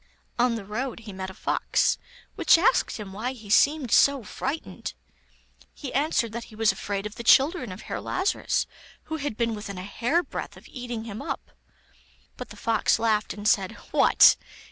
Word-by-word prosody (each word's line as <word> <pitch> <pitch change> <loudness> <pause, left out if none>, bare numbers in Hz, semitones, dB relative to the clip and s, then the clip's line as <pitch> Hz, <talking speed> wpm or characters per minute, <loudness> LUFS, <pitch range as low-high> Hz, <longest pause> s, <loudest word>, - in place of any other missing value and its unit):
On 245 -1 +3
the 215 -3 -6
road 230 +4 -4
he 210 -3 -9
met 190 0 -5
a - - -9
fox, - - +1 0.3
which - - +5
asked 350 - +2
him 205 -3 -8
why 235 +6 -3
he 215 -5 -10
seemed 285 0 +4
so 280 -3 +5
frightened. 280 +8 -5 0.8
He 280 - -7
answered 275 -5 +1
that 230 +1 -5
he 215 - -15
was 220 -1 +3
afraid 200 0 -4
of 210 - -5
the 235 - -6
children 270 - +4
of 185 - -9
Herr - - -5
Lazarus, 375 +2 0 0.4
who 315 - -4
had 285 -7 -4
been 230 -1 0
within 205 -2 -6
a 180 - -5
hair 245 - 0
breadth - - -6
of - - -15
eating 245 -3 -6
him 220 -2 -7
up. - - -5 0.8
But - - -8
the - - -12
fox 225 -2 +2
laughed, 220 -2 0
and 205 0 -3
said: 195 -3 +2 0.2
'What! - - +6
230 Hz, 185 wpm, -26 LUFS, 210-270 Hz, 0.8 s, What